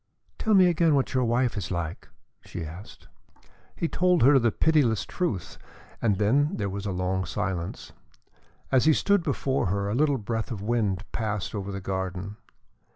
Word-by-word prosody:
"Tell 220 -1 +2
me 190 -1 +7
again 165 -3 +3
what 135 0 0
your 130 -1 +2
wife 120 +1 +1
is 100 -4 -4
like?" 85 -2 -4 0.4
she 85 - -6
asked. 85 +6 -11 0.7
He 165 - -1
told 180 -2 +2
her 135 +2 +7
the 115 -2 +2
pitiless 140 -9 +2
truth 115 - -3 0.4
and 105 -4 +2
then 135 +9 +2
there 100 -2 -2
was 100 +1 -4
a - - -1
long 95 +1 -1
silence. 85 +1 -4 0.8
As 130 0 +4
he 155 - +6
stood 200 +5 +2
before 135 - -1
her, 100 +2 -1
a - - -1
little 145 +2 +2
breath 115 0 -3
of 115 -5 -4
wind 105 -3 0
passed 105 -3 -3
over 100 -2 -4
the 100 0 -5
garden. 95 +1 -4
110 Hz, 170 wpm, -26 LUFS, 95-140 Hz, 0.8 s, me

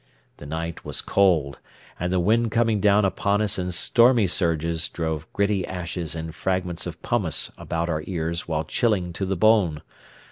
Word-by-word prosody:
The 75 - -10
night 80 +2 -5
was - - -3
cold, 85 -8 +2 0.4
and 90 +1 -1
the 95 - +2
wind 115 +6 +2
coming 115 -1 +1
down 105 +1 +4
upon 100 +1 +1
us 105 -2 0
in 90 0 -2
stormy 115 +5 +4
surges 85 -2 0
drove 80 -1 -4
gritty 100 -1 +1
ashes 85 -3 -5
and 80 0 -5
fragments 90 -1 -2
of 85 -1 -7
pumice 100 -10 -1
about 85 0 -3
our 75 -2 -2
ears 85 -2 -3
while 80 -1 -1
chilling 95 -1 0
to 95 +3 -3
the 95 0 -1
bone. 95 -7 +3
90 Hz, 170 wpm, -24 LUFS, 80-100 Hz, 0.4 s, down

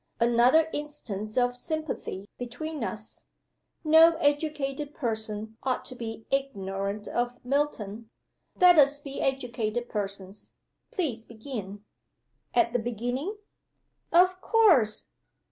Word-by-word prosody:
"Another 240 +7 +5
instance 230 -8 -5
of 245 0 +2
sympathy 310 - -4
between 250 +4 -5
us. 215 -1 -6 0.6
No 325 +1 +7
educated 290 -1 -1
person 220 -3 -3
ought 260 -1 -1
to 255 - -6
be 225 -2 -6
ignorant 200 -6 -2
of 245 0 -1
Milton. 235 -6 -1 0.5
Let 355 -3 +8
us 285 0 +5
be 275 -1 -6
educated 240 -3 -1
persons. 200 -1 -5 0.4
Please 260 -11 -2
begin." 215 -4 -7 0.7
"At 235 -1 +3
the 245 - +2
beginning?" 245 - -3 0.7
"Of 365 +2 +4
course! 335 - +4
245 Hz, 105 wpm, -28 LUFS, 220-295 Hz, 0.7 s, Let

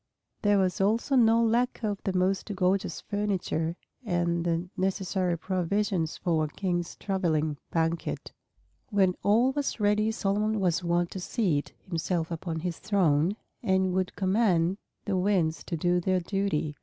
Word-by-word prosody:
There 205 -1 +4
was 190 -1 +1
also 225 +7 +2
no 230 -2 +5
lack 240 +2 +1
of 205 -2 -1
the 190 -1 0
most 190 +3 0
gorgeous 185 +1 0
furniture 190 -5 -1 0.3
and 175 -4 0
the 170 +1 -1
necessary 185 -2 0
provisions 185 -1 -1
for 165 -3 +1
a - - -3
king's 175 +1 -2
traveling 160 -6 0
banquet. 165 0 -1 0.6
When 195 -4 +3
all 230 +6 +4
was 285 -3 -2
ready 210 +1 +2
Solomon 215 +1 0
was 180 -2 +1
wont 175 0 +1
to 190 - -5
seat 180 -7 -1
himself 170 -1 -1
upon 165 -1 -3
his 175 -1 -3
throne, 180 -3 +2 0.3
and 190 -3 +2
would 185 0 -1
command 190 -3 +2 0.3
the 195 -3 0
winds 180 -4 +1
to 170 - -3
do 175 +2 +2
their 185 +1 +1
duty. 180 -5 -1
185 Hz, 145 wpm, -28 LUFS, 170-205 Hz, 0.6 s, no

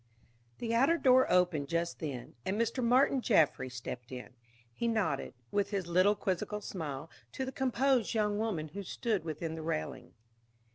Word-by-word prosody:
The 230 -1 -2
outer 270 +9 +4
door 260 -3 +5
opened 175 -6 +3
just 170 0 -1
then, 135 -6 -5
and 195 +3 -1
Mr. 230 +2 0
Martin 255 +2 +4
Jaffry 160 - +3
stepped 125 0 -7
in. 125 -1 -7 0.4
He 235 - -2
nodded, 195 - 0 0.2
with 205 -1 +1
his 195 -3 -2
little 185 +4 +4
quizzical 200 +1 -2
smile, 155 -7 -5 0.3
to 265 - -2
the 260 - -4
composed 260 -3 +1
young 210 -1 +1
woman 185 -9 -2
who 200 +7 -6
stood 200 0 -2
within 160 0 -4
the 160 - -5
railing. 80 - -4
195 Hz, 160 wpm, -32 LUFS, 155-230 Hz, 0.4 s, door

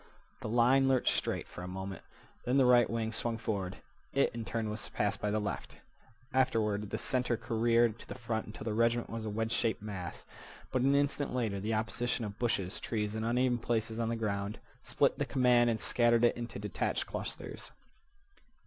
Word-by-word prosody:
The - - -5
line 125 +4 +4
lurched 130 -2 +3
straight - - -1
for - - -9
a 90 - -5
moment. 95 +1 -5 0.4
Then 125 +3 +2
the 135 - +6
right 120 -2 +6
wing 115 -1 -1
swung 115 0 -2
forward; 100 -5 -3 0.4
it 140 - +2
in 115 0 -4
turn 115 -1 -2
was 105 - -4
surpassed - - -1
by 105 - 0
the 105 - +1
left. 105 -1 -4 0.6
Afterward 105 -5 +1
the - - -2
center 125 -2 0
careered 115 0 +2
to - - -12
the - - -6
front 115 -2 -3
until 105 - -8
the 110 -1 -2
regiment 115 +1 +2
was 115 -1 -4
a - - -2
wedge 110 +2 -1
shaped 115 -1 +1
mass, 95 -5 -6 0.5
but 130 - +1
an 135 +2 +4
instant 145 -1 0
later 110 -6 0
the 110 +3 -1
opposition 115 +2 -1
of 105 - -4
the 105 - -29
bushes, 100 -6 -1
trees, 105 -2 -2
and 110 0 -2
uneven 120 +1 +2
places 115 -1 -1
on 115 -1 0
the 115 - 0
ground 100 -2 -2 0.2
split - - +1
the - - +2
command 125 -2 +4
and 115 -1 0
scattered 120 -1 +3
it 120 - +5
into 120 0 -5
detached - - -1
clusters. - - -5
115 Hz, 195 wpm, -32 LUFS, 105-120 Hz, 0.6 s, the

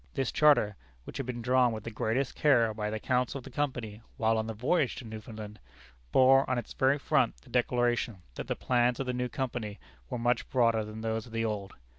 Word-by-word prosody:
This 135 -4 0
charter 145 -9 +4 0.3
which - - -8
had 135 - -4
been 120 -2 -4
drawn 125 0 +4
with 110 -2 -5
the 115 - -6
greatest 115 +5 -1
care 120 -7 +3
by 105 -1 -3
the 110 0 -3
counsel 125 +3 0
of 135 - -9
the - - -10
Company, 120 -7 -3 0.2
while 115 0 +2
on 110 - -2
the 110 - -4
voyage 130 +5 +1
to 125 - -8
Newfoundland 110 -1 -8 0.5
bore 135 +1 +5
on 130 - +1
its 120 - -5
very 135 +2 +3
front 140 - +1
the - - -18
declaration 120 -5 0
that - - -6
the - - -1
plans 120 -1 +1
of 135 - -1
the 125 - -2
new 125 0 -2
Company 120 -6 -4 0.3
were - - -3
much 120 0 0
broader 115 -3 +3
than 110 +1 -8
those 115 +1 -2
of 115 - -14
the 115 0 0
old. 100 -3 -4
120 Hz, 220 wpm, -30 LUFS, 110-130 Hz, 0.5 s, bore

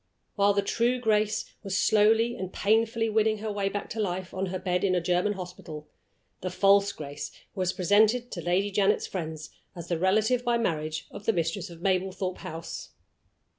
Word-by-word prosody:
While 200 0 +3
the 200 - +2
true 235 +5 +1
Grace 215 -2 +1 0.2
was 195 -2 -2
slowly 225 +3 +4
and 190 -6 -5
painfully 225 +3 +2
winning 220 0 +2
her 215 +1 -4
way 200 -1 -1
back 205 0 -4
to 225 - -4
life 185 -3 -2
on 190 +1 -2
her 185 +1 -3
bed 180 -1 -1
in 185 -2 +2
a - - +3
German 180 +4 +1
hospital, 175 -5 -8 0.5
the 185 - -3
false 200 +2 +4
Grace 145 -3 -6 0.2
was 185 -1 0
presented 215 +7 +3
to 170 - -5
Lady 185 +4 +1
Janet's 200 +1 +2
friends 160 -4 -5 0.2
as 170 -1 -8
the 170 -2 0
relative 215 +7 +2
by 240 -1 +2
marriage 155 -8 -2
of 205 0 -9
the 225 - +4
Mistress 170 +2 -2
of 170 0 -12
Mablethorpe 185 -1 -1
House. 165 +1 -7
195 Hz, 180 wpm, -28 LUFS, 180-215 Hz, 0.5 s, slowly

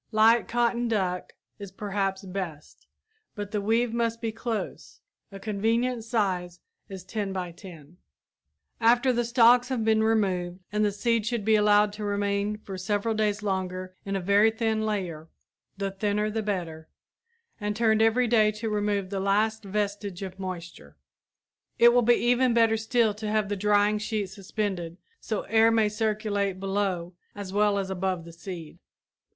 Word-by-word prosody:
Light 225 +1 +4
cotton 240 0 +1
duck 185 -5 -1 0.3
is 200 -2 -8
perhaps 195 -1 -2
best, 180 -6 -7 0.5
but 205 -2 -5
the 210 - -1
weave 225 +3 +1
must 230 -1 -1
be 230 -1 -2
close. 225 0 -5 0.3
A 195 - -9
convenient 225 +4 0
size 190 -6 -1 0.3
is 190 -2 -8
10 195 0 -4
x 175 -2 -6
10 170 -7 -11
feet. 160 +5 -22 0.8
After 245 +3 +4
the 240 0 +1
stalks 240 +1 +5
have 245 -4 -1
been 220 0 +3
removed 190 -5 +1
the 210 0 +1
seed 230 +1 0
should 235 -4 -2
be 220 - +4
allowed 210 -1 +4
to 210 0 -7
remain 205 0 -1
for 195 -3 -8
several 205 +4 -1
days 210 -1 0
longer 185 -2 -3
in 195 0 -3
a - - 0
very 200 +4 +4
thin 220 -1 -1
layer 175 -7 -3 0.5
the 195 0 -2
thinner 210 +2 -1
the 220 +1 -1
better 170 -6 -4 0.7
and 210 -1 -2
turned 220 -1 +3
every 225 +3 +3
day 220 -2 +4
to 215 +1 -4
remove 205 -2 -1
the 195 - -2
last 215 +3 +1
vestige 200 -1 -3
of 190 0 -7
moisture. 175 - -7 0.8
It 235 0 +7
will 245 - +5
be 240 +1 +5
even 245 0 +2
better 225 -1 +4
still 220 0 +1
to 210 +1 -5
have 215 -2 0
the 205 - -1
drying 205 +1 +2
sheet 210 -2 -2
suspended 190 -3 -4 0.2
so 215 - -3
air 225 +2 +4
may 225 -2 +3
circulate 210 -3 -1
below 195 -3 -2 0.2
as 200 -2 -7
well 205 0 +3
as 195 -1 -2
above 185 -2 -2
the 170 - -11
seed. 165 -2 -9
210 Hz, 165 wpm, -27 LUFS, 190-220 Hz, 0.8 s, It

